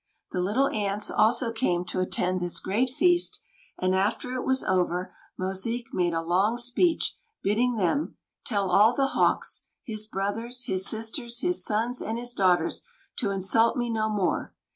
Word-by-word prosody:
The 180 - -2
Little 220 +10 +2
Ants 205 0 -1
also 230 +2 +3
came 180 -7 0
to 180 - -3
attend 185 0 0
this 175 -1 -1
great 230 +7 0
feast; 350 +6 +2 0.4
and 185 0 +1
after 205 +6 0
it 255 - -2
was 265 0 +2
over, 180 -1 0 0.3
Mosique 195 +6 -3
made 175 -2 +1
a 165 - -1
long 190 +7 +2
speech, 250 +8 +1 0.3
bidding 235 +5 +1
them: 215 - 0 0.3
"Tell 200 -4 -1
all 215 +6 +5
the 270 +1 +1
Hawks, - - +1 0.2
his 215 -2 -2
brothers, 225 +5 -2
his 190 -5 +1
sisters, 235 +2 -2
his 360 0 +1
sons, 230 +4 0
and 225 +1 -3
his 240 0 -4
daughters, 185 -5 +2 0.4
to 215 - 0
insult 200 +5 +2
me 240 -1 -1
no 220 -1 0
more. 205 -4 -1
215 Hz, 165 wpm, -26 LUFS, 190-240 Hz, 0.4 s, all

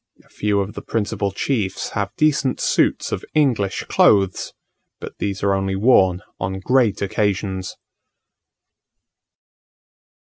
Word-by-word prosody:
A - - -27
few 105 -1 0
of 100 +2 -5
the - - -7
principal 105 -2 -2
chiefs 100 -3 -2
have 100 -3 -2
decent 150 -3 +1
suits - - +1
of - - -3
English 120 -10 +1
clothes; 95 -2 +2 0.5
but - - -9
these 100 -1 -3
are 100 -1 +3
only 95 0 -1
worn 95 -4 +3 0.2
on 95 +1 -3
great 120 -1 +2
occasions. 95 -2 -2
100 Hz, 115 wpm, -21 LUFS, 95-110 Hz, 0.5 s, are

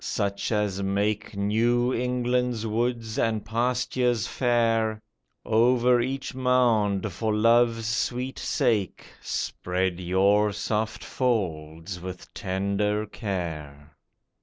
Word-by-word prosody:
such 100 +2 -2
as 105 -3 0
make 100 +2 -1
New 120 +5 +2
England's 125 -1 0
woods 115 0 -1
and 110 -2 0
pastures 120 0 0
fair, 115 -3 +1 0.5
Over 120 +2 +4
each 135 +2 -3
mound, 115 -6 +2
for 110 +4 -1
Love's 115 +1 +3
sweet 125 +3 -2
sake, 115 - 0 0.2
Spread 90 0 -2
your 100 +3 +2
soft 110 +3 -2
folds 90 - -2
with 90 0 -9
tender 100 +3 -1
care. 80 - -6
110 Hz, 95 wpm, -26 LUFS, 100-120 Hz, 0.5 s, Over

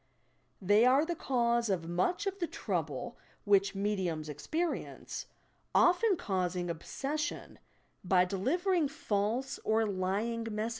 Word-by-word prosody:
They 205 +3 +4
are 265 +5 +5
the 345 +1 -2
cause 235 -5 +1
of 175 -4 -1
much 180 - 0
of 395 0 -2
the 340 - 0
trouble - - -3 0.2
which 200 -1 +3
mediums 190 -6 -1
experience, 310 - -3 0.5
often 365 +2 +4
causing 180 -5 -1
obses 275 - -4
sion 300 - -4 0.4
by 180 -1 +4
delivering 310 - +1
false 240 -1 -1
or 220 +1 +2
lying 210 +4 -1
messages. 215 +1 -2
215 Hz, 120 wpm, -32 LUFS, 190-285 Hz, 0.5 s, are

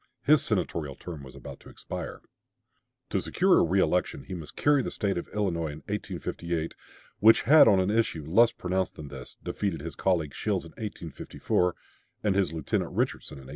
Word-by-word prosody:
His 150 +1 +5
senatorial 85 -8 -1
term 80 -2 -8
was 65 -1 -12
about 70 - -9
to - - -14
expire. - - -7 0.9
To - - +1
secure - - +3
a - - +5
reelection 90 -4 +1
he - - -8
must 80 -4 -7
carry 145 -1 +3
the - - -3
State 100 -3 -1
of 85 - -4
Illinois 85 -7 -1
in - - -13
1858, 85 -1 -3 0.5
which 110 +1 +6
had 150 +1 +8
on 100 -4 +6
an 95 +2 +1
issue 105 -9 0
less 115 +9 +5
pronounced 95 +1 -2
than 75 -2 -8
this 65 -3 -9
defeated 95 -7 -2
his 80 0 -6
colleague 80 -4 0
Shields 100 -5 -1
in 80 - -11
1854, 90 -3 -2 0.5
and 105 -2 +2
his 95 -3 +1
lieutenant 80 -3 -2
Richardson - - -2
in - - -10
1856. 65 - -13
90 Hz, 180 wpm, -28 LUFS, 80-105 Hz, 0.9 s, had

